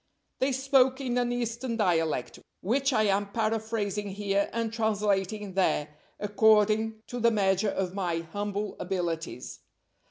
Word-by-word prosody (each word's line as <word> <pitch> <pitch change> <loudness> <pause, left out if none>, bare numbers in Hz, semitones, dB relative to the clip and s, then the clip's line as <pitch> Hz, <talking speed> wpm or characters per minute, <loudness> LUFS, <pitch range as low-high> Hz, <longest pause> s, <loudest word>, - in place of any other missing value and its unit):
They 265 +1 +2
spoke 265 0 +3
in 250 -2 -1
an 245 0 0
Eastern 235 0 -2
dialect, 165 - 0 0.2
which 270 +8 +1
I 220 -4 +3
am 200 0 +1
paraphrasing 215 -2 -1
here 200 0 0
and 230 -1 -2
translating 210 -2 0
there, 180 -5 +1 0.3
according 215 +1 +3
to 245 - -6
the 235 0 +4
measure 200 -2 +2
of 185 -2 -2
my 175 -4 -1
humble 205 0 -3
abilities. 170 -7 -4
210 Hz, 130 wpm, -28 LUFS, 195-230 Hz, 0.3 s, the